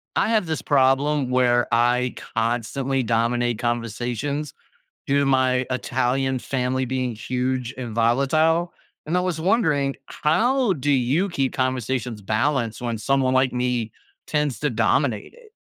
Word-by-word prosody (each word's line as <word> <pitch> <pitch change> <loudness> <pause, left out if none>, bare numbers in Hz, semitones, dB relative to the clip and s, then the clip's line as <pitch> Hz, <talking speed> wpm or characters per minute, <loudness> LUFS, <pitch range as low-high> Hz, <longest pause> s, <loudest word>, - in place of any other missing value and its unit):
I - - +2
have 220 -4 +2
this 160 -1 -3
problem 135 0 +2
where 120 -1 +3
I 120 +1 +2 0.2
constantly 120 +4 -1
dominate 120 0 0
conversations, 120 +5 -3 0.5
due 140 +1 +2
to 140 - +2
my 130 -1 +2
Italian 130 +1 0
family 130 0 -1
being 130 -1 -2
huge 125 +2 -2
and 120 -3 -5
volatile. 150 +9 +2 0.3
And 160 +4 -1
I - - +3
was 180 -3 -2
wondering, 160 - +1
how 235 - +1
do 145 -3 -3
you 140 +9 +1
keep 135 -7 -1
conversations 125 -3 -2
balanced 115 +2 0
when 120 -2 -2
someone 130 +3 +1
like 130 0 +2
me 125 -2 -1 0.3
tends 150 -4 -1
to 150 -2 0
dominate 115 0 0
it? 460 -3 -19
130 Hz, 140 wpm, -23 LUFS, 120-145 Hz, 0.5 s, where